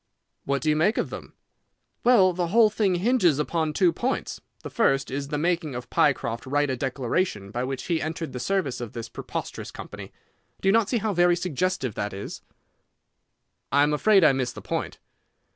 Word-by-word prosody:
"What 140 Hz, 0 st, -1 dB
do 155 Hz, -, +1 dB
you -, -, +2 dB
make 185 Hz, +9 st, +2 dB
of -, -, -1 dB
them?" -, -, -9 dB, 0.7 s
"Well, 200 Hz, -7 st, +5 dB
the 175 Hz, 0 st, -1 dB
whole 215 Hz, +3 st, +5 dB
thing 200 Hz, -4 st, +1 dB
hinges 180 Hz, -, +3 dB
upon 155 Hz, +1 st, -1 dB
two 170 Hz, +2 st, +3 dB
points. 250 Hz, +9 st, -3 dB, 0.2 s
The -, -, -7 dB
first 135 Hz, -, +1 dB
is 140 Hz, +1 st, -3 dB
the 150 Hz, -, -2 dB
making 165 Hz, -3 st, -1 dB
of 125 Hz, 0 st, -7 dB
Pycroft 115 Hz, +2 st, +1 dB
write 145 Hz, +1 st, +1 dB
a -, -, -1 dB
declaration 125 Hz, -, -2 dB
by 120 Hz, +3 st, -2 dB
which 135 Hz, 0 st, -4 dB
he 170 Hz, -3 st, -1 dB
entered 160 Hz, -2 st, -4 dB
the 125 Hz, -, -4 dB
service 175 Hz, -6 st, -1 dB
of 120 Hz, -3 st, -6 dB
this 115 Hz, -1 st, -6 dB
preposterous -, -, -6 dB
company. -, -, -9 dB, 0.5 s
Do -, -, -2 dB
you -, -, +4 dB
not 225 Hz, -2 st, +3 dB
see 245 Hz, -, +1 dB
how 215 Hz, -1 st, -1 dB
very 175 Hz, 0 st, +4 dB
suggestive 180 Hz, -, -1 dB
that 105 Hz, 0 st, -3 dB
is?" 100 Hz, -, -7 dB, 1.3 s
"I 140 Hz, +1 st, +5 dB
am 150 Hz, +1 st, +2 dB
afraid 195 Hz, +5 st, +4 dB
I 155 Hz, -, +7 dB
miss 130 Hz, -2 st, -1 dB
the -, -, -9 dB
point." -, -, -4 dB
160 Hz, 195 wpm, -25 LUFS, 135-185 Hz, 1.3 s, I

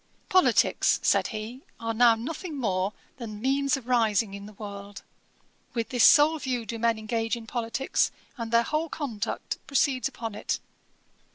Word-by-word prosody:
'Politicks 370 Hz, -1 st, +4 dB
(said -, -, +3 dB
he) 220 Hz, +4 st, -6 dB, 0.2 s
are 230 Hz, 0 st, -2 dB
now 235 Hz, 0 st, +6 dB
nothing 305 Hz, +7 st, -5 dB
more 195 Hz, -6 st, 0 dB, 0.3 s
than 215 Hz, -4 st, -7 dB
means 275 Hz, +3 st, +1 dB
of 250 Hz, -3 st, -11 dB
rising 225 Hz, -4 st, +2 dB
in 200 Hz, 0 st, -8 dB
the 215 Hz, -, -12 dB
world. 200 Hz, -1 st, -9 dB, 0.7 s
With 230 Hz, -2 st, -1 dB
this 245 Hz, -2 st, +2 dB
sole 310 Hz, +2 st, +7 dB
view 255 Hz, -4 st, -2 dB
do 230 Hz, 0 st, -5 dB
men 230 Hz, 0 st, +2 dB
engage 225 Hz, +1 st, -1 dB
in 230 Hz, -1 st, -9 dB
politicks, 235 Hz, +3 st, 0 dB, 0.3 s
and 230 Hz, -2 st, -5 dB
their 235 Hz, 0 st, +5 dB
whole 310 Hz, +5 st, -1 dB
conduct 240 Hz, -11 st, -4 dB
proceeds 270 Hz, -2 st, +2 dB
upon 230 Hz, -5 st, -6 dB
it. 210 Hz, -, -2 dB
230 Hz, 160 wpm, -27 LUFS, 220-265 Hz, 0.7 s, sole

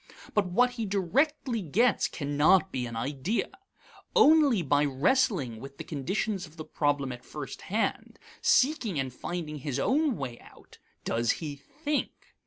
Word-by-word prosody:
But 205 Hz, -3 st, +2 dB
what 245 Hz, +8 st, +3 dB
he 230 Hz, -3 st, -4 dB
directly 230 Hz, -, 0 dB
gets 210 Hz, -, +2 dB
cannot 150 Hz, +6 st, +2 dB
be 125 Hz, -2 st, -2 dB
an 120 Hz, -, -7 dB
idea. 140 Hz, -, -2 dB, 0.7 s
Only 300 Hz, -, +5 dB
by 145 Hz, 0 st, +3 dB
wrestling 145 Hz, -, +1 dB
with 135 Hz, +3 st, -10 dB
the -, -, -6 dB
conditions 185 Hz, +6 st, -2 dB
of 155 Hz, +2 st, -19 dB
the 155 Hz, -, -7 dB
problem 145 Hz, -3 st, 0 dB
at 125 Hz, 0 st, -8 dB
first 150 Hz, -2 st, -7 dB
hand, 215 Hz, +4 st, -2 dB, 0.2 s
seeking 270 Hz, -, +2 dB
and 130 Hz, -2 st, -3 dB
finding 155 Hz, +1 st, -5 dB
his 140 Hz, -1 st, -3 dB
own 285 Hz, -, +1 dB
way 125 Hz, -4 st, -5 dB
out, -, -, -18 dB, 0.2 s
does 115 Hz, +1 st, +1 dB
he 150 Hz, -3 st, -6 dB
think. 290 Hz, -, -4 dB
175 Hz, 150 wpm, -28 LUFS, -, 0.7 s, Only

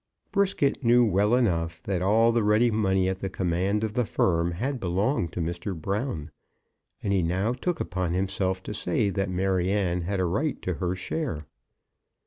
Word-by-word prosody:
Brisket 190 Hz, -9 st, +1 dB
knew 120 Hz, +1 st, +5 dB
well 105 Hz, +2 st, +3 dB
enough 85 Hz, -8 st, 0 dB
that 95 Hz, -3 st, -1 dB
all 110 Hz, +5 st, +4 dB
the 115 Hz, -1 st, +1 dB
ready 105 Hz, +3 st, +4 dB
money 95 Hz, -4 st, +2 dB
at 95 Hz, 0 st, -2 dB
the 95 Hz, -, -3 dB
command 95 Hz, +3 st, 0 dB
of 110 Hz, -1 st, -2 dB
the 125 Hz, -, +1 dB
firm 85 Hz, -5 st, +1 dB
had 130 Hz, +9 st, -2 dB
belonged 95 Hz, -, 0 dB
to 90 Hz, -, -2 dB
Mr. 85 Hz, +2 st, -4 dB
Brown, 95 Hz, -, -3 dB, 0.7 s
and 100 Hz, -, 0 dB
he 95 Hz, -, +3 dB
now 95 Hz, +7 st, 0 dB
took 165 Hz, +6 st, -2 dB
upon 90 Hz, -1 st, -2 dB
himself 95 Hz, 0 st, -1 dB
to -, -, -5 dB
say 100 Hz, +1 st, 0 dB
that 95 Hz, 0 st, -1 dB
Maryanne 95 Hz, 0 st, 0 dB
had 95 Hz, +3 st, -2 dB
a 90 Hz, -, +2 dB
right 140 Hz, -, -1 dB
to 90 Hz, -, -1 dB
her 90 Hz, 0 st, 0 dB
share. 95 Hz, -, -3 dB
95 Hz, 175 wpm, -26 LUFS, 90-110 Hz, 0.7 s, knew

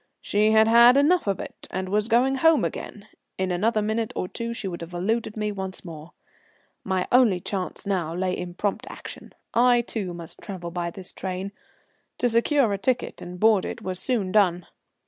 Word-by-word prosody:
She 210 Hz, +1 st, +2 dB
had 220 Hz, 0 st, +5 dB
had 235 Hz, +3 st, +7 dB
enough 305 Hz, -, +3 dB
of 195 Hz, -3 st, 0 dB
it, -, -, -9 dB
and 185 Hz, 0 st, -3 dB
was 210 Hz, +3 st, 0 dB
going 245 Hz, +3 st, +3 dB
home 325 Hz, +3 st, +4 dB
again. -, -, -6 dB, 0.3 s
In 190 Hz, -1 st, -1 dB
another 215 Hz, +4 st, +1 dB
minute 220 Hz, +1 st, -1 dB
or 185 Hz, -, -2 dB
two 235 Hz, +4 st, -5 dB
she 230 Hz, -4 st, -4 dB
would 175 Hz, -2 st, -5 dB
have 170 Hz, +1 st, -8 dB
eluded 220 Hz, +4 st, -1 dB
me 210 Hz, 0 st, -1 dB
once 190 Hz, -2 st, -5 dB
more. 160 Hz, -1 st, -10 dB, 0.7 s
My 190 Hz, -1 st, -1 dB
only 240 Hz, -7 st, +5 dB
chance 185 Hz, +2 st, -4 dB
now 185 Hz, -5 st, -1 dB
lay 185 Hz, 0 st, -1 dB
in 175 Hz, -1 st, -6 dB
prompt 205 Hz, +1 st, -2 dB
action. -, -, -9 dB, 0.2 s
I, 240 Hz, +1 st, +5 dB
too, 200 Hz, -6 st, -4 dB
must 170 Hz, -1 st, -9 dB
travel 175 Hz, -4 st, -6 dB
by 175 Hz, 0 st, -2 dB
this 185 Hz, +1 st, -9 dB
train. 190 Hz, +1 st, -4 dB, 0.7 s
To 245 Hz, -, +1 dB
secure 235 Hz, 0 st, +2 dB
a 200 Hz, -, -3 dB
ticket 245 Hz, +3 st, -1 dB
and 180 Hz, 0 st, -8 dB
board 215 Hz, -2 st, +4 dB
it -, -, -6 dB
was 185 Hz, -1 st, 0 dB
soon 220 Hz, -8 st, 0 dB
done. 180 Hz, -4 st, +3 dB
200 Hz, 190 wpm, -25 LUFS, 180-230 Hz, 0.7 s, had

